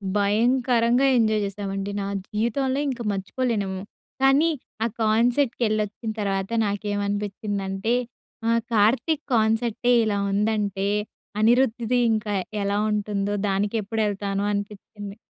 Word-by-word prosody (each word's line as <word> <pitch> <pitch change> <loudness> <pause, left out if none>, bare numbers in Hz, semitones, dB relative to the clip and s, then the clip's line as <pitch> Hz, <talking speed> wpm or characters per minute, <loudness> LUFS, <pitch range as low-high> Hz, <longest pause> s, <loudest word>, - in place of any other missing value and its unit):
భయంకరంగా 235 +4 +3
ఎంజాయ్ 215 -2 +2
జేశామండి. 195 0 -4
నా 195 - -3 0.2
జీవితంలో 260 +5 0
ఇంక 250 -3 -4
మర్చిపోలేనేమో! 200 -1 -2 0.4
కానీ 275 +5 +5 0.3
ఆ - - +2 0.2
కాన్సర్ట్‌కి 240 +4 +2
ఎల్లోచ్చిన 215 +1 -2
తర్వాత 195 -1 -1 0.2
నాకేమనిపించిందంటే 205 0 -2 0.5
ఆ! - - +3 0.2
కార్తీక్ 235 +8 +2
కాన్సర్టే 225 +2 +2
ఇలా 205 -2 0
ఉందంటే, 205 -1 0 0.5
అనిరుద్‌ది 240 +1 +3
ఇంకా 215 -1 -1 0.3
యెలా 200 0 0
ఉంటుందో? 205 -1 -1
దానికెప్పుడు 205 +2 -1
ఎళ్తానో 200 0 -2
అనిపిచ్చింది? 205 0 -6
210 Hz, 100 wpm, -24 LUFS, 200-235 Hz, 0.5 s, కానీ